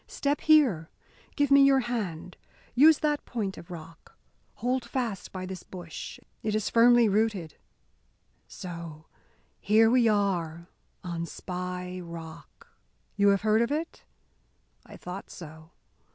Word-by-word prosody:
Step 285 0 -1
here! 255 - +4 0.5
Give 285 -2 +1
me 280 0 +8
your 275 -1 +5
hand 200 -8 -4 0.4
use 300 +5 +7
that 295 -1 0
point 205 -6 -3
of 170 - -12
rock 165 -1 -11 0.4
hold 250 +1 -1
fast 235 -4 -4
by 185 -1 -5
this 185 -1 -7
bush; 175 -4 -9 0.2
it 215 -1 -1
is 215 - -1
firmly 235 0 +6
rooted 205 -6 0 0.9
so! 170 -3 -8 0.5
Here 225 +2 +4
we 245 -2 +4
are 175 -5 0 0.3
on 170 -2 -4
Spy 180 +1 -5
Rock! 170 - -10 0.5
You 200 0 +3
have 200 -1 +4
heard 215 +1 +3
of 235 - 0
it? 315 +3 -3 0.8
I - - -11
thought 180 +2 -8
so. 160 -1 -11
200 Hz, 130 wpm, -28 LUFS, 170-240 Hz, 0.9 s, me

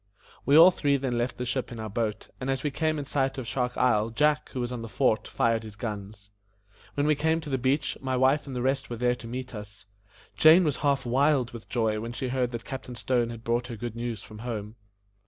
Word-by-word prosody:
We 140 +2 +6
all 170 +3 +10
three 145 -5 +1
then 130 -2 -2
left 120 +1 -2
the 125 - -3
ship 130 +1 -2
in 120 - -7
our 110 - -4
boat, 110 0 -3
and 130 0 -3
as 135 0 -1
we 150 - 0
came 155 +2 0
in 145 - -4
sight 135 -1 0
of 130 - -4
Shark 125 +1 -2
Isle, 110 -3 +3
Jack, 150 +6 +1
who 130 - -5
was 120 0 -2
on 125 -2 -4
the 115 - -7
fort, 110 -2 +1
fired 115 -1 +1
his 110 -2 -10
guns. 105 -2 -7 0.6
When 145 - +1
we 155 - +4
came 160 +2 +1
to 150 -2 -7
the 130 - 0
beach, 135 +3 +1
my 130 -1 -1
wife 135 +4 +3
and 135 - -6
the 125 - -2
rest 135 +1 0
were 120 - -4
there 125 +1 +2
to 120 -1 -9
meet 125 +2 -6
us. 100 -2 -9 0.5
Jane 160 +4 +7
was 150 -4 0
half 140 -3 +1
wild 130 0 +2
with 115 -2 -10
joy 110 -3 0
when 115 +2 -5
she 130 +1 -3
heard 125 -1 0
that 120 -1 -6
Captain 130 -2 -6
Stone 120 -1 0
had 115 -1 -8
brought 120 +1 0
her 120 - -6
good 115 +1 -5
news 115 -3 -4
from 105 -1 -11
home. 110 -2 -5
125 Hz, 245 wpm, -27 LUFS, 115-135 Hz, 0.6 s, all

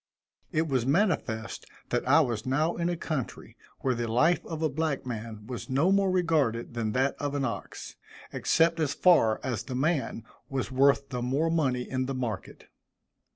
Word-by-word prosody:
It 160 +1 +1
was 130 -5 +1
manifest 135 - 0 0.2
that 120 - -1
I 145 +5 +6
was 120 -7 -1
now 155 +6 +1
in 170 0 -1
a 175 - -2
country 155 -7 -5 0.3
where 130 - +1
the 120 -1 -3
life 160 +9 +3
of 160 -1 -4
a - - +4
black 155 -1 -2
man 110 -3 -6
was 125 +3 -7
no 140 +8 +3
more 195 -1 +3
regarded 155 -11 +1
than 110 -2 -2
that 130 +2 +1
of 145 0 -2
an 140 -2 0
ox, 115 - -6 0.4
except 165 0 +2
as 150 -3 0
far 115 -12 +4
as 130 -3 -2
the 130 - -6
man 140 -4 0 0.3
was 135 0 -3
worth 140 +1 +3
the 125 -1 -3
more 140 +7 0
money 130 -7 0
in 130 -1 -2
the 135 - -3
market. 120 -6 -5
135 Hz, 180 wpm, -28 LUFS, 125-160 Hz, 0.4 s, I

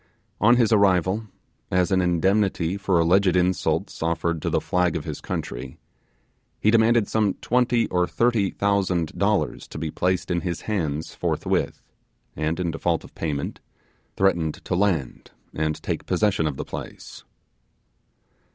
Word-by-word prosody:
On 120 +4 +5
his 120 -3 +3
arrival, 100 0 +3 0.4
as 90 +1 +1
an 95 -1 +3
indemnity 90 0 +1
for 100 -2 +1
alleged 90 +3 +3
insults 90 0 0
offered 85 0 -1
to - - -1
the - - +1
flag 90 -2 0
of 80 - -3
his 75 -3 -5
country, 65 +2 -5 0.8
he 105 - +3
demanded 115 -1 +4
some 105 -3 +1
twenty 120 -1 +1
or 90 -1 +1
thirty 115 -5 +1
thousand 95 -5 0
dollars - - 0
to - - -9
be 80 0 -3
placed 90 +2 -1
in 85 -1 0
his 85 -3 -3
hands 80 -8 -2
forthwith, - - -1 0.5
and 80 +3 -1
in 85 -2 -1
default 80 +1 -1
of - - -14
payment, 75 -3 -3 0.6
threatened 85 -5 +2
to - - -2
land 90 -9 0 0.2
and 80 0 -1
take - - -3
possession 100 -7 +1
of 70 -3 -4
the - - -4
place. - - -9
90 Hz, 145 wpm, -24 LUFS, 80-100 Hz, 0.8 s, On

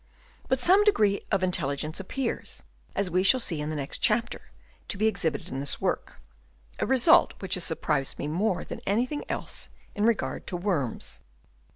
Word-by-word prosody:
But 260 0 +1
some 375 +10 +6
degree 210 - +3
of 195 -2 +2
in 185 - +2
telligence 150 +1 -2
appears, 235 +6 -4 0.3
as 195 -3 -1
we 185 +2 +3
shall 195 +7 +5
see 165 -10 -2
in 150 - -3
the 155 - -3
next 140 -2 -2
chapter, 230 +2 0 0.4
to 200 - -3
be 215 - +1
exhibited 195 -7 0
in 135 - -4
this 140 0 -1
work, - - -1 0.3
— - - -30
a - - 0
result 265 +7 +5
which 190 -1 -2
has 180 - +2
surprised 150 -4 -1
me - - -3
more 180 +5 0
than - - -7
anything 250 +9 0
else - - -4 0.2
in 205 - -2
regard 230 -1 0
to 180 - -2
worms. 175 - -2
195 Hz, 185 wpm, -27 LUFS, 155-230 Hz, 0.4 s, some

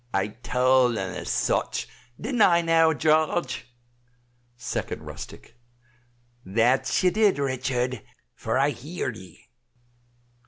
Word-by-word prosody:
"I 95 +2 +1
tawld 125 +1 +2
un 95 -2 -3
as - - -1
much, - - -1 0.3
dinn't 240 +1 -2
I 170 -3 +5
now, 165 -1 +4
Jarge?" 155 -4 0 0.9
2d 125 - -4
Rustic. 120 - -11 0.8
"That 120 - +1
ye 180 - +4
did, 210 -1 +3
Richard, 130 -3 -1 0.3
for - - -2
I 140 +2 +3
heerd 145 -1 -5
ee." 95 -3 -15
130 Hz, 110 wpm, -25 LUFS, 120-165 Hz, 0.9 s, I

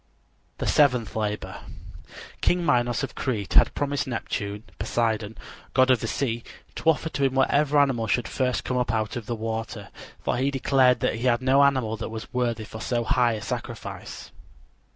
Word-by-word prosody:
THE - - -3
SEVENTH 125 -7 +3
LABOR 105 -1 -3 0.8
King 175 -1 +2
Minos 120 -2 +2
of 135 - -4
Crete 105 -8 -3
had - - +5
promised 145 -1 -1
Neptune 105 -4 -4 0.2
(Poseidon), 110 -2 -1 0.4
god 130 0 +5
of 125 - +4
the 115 - -3
sea, 120 -2 -2 0.3
to 165 - +1
offer 160 0 +2
to 140 - -2
him 135 0 0
whatever 145 +2 +3
animal 130 -6 +3
should 110 0 +1
first 130 -2 -1
come 125 - -1
up 125 -1 0
out 110 -2 -1
of 120 -3 -6
the 120 - -2
water, 110 0 -4 0.3
for - - -1
he 135 +3 +1
declared 135 -2 +3
he 115 +3 0
had 120 +1 +2
no 135 +2 +5
animal 130 -6 +2
that 110 - -5
was 110 +3 -8
worthy 120 -3 0
for 110 +1 -9
so 120 +1 -1
high 120 +1 +2
a 110 - -5
sacrifice. - - -6
120 Hz, 175 wpm, -25 LUFS, 110-135 Hz, 0.8 s, had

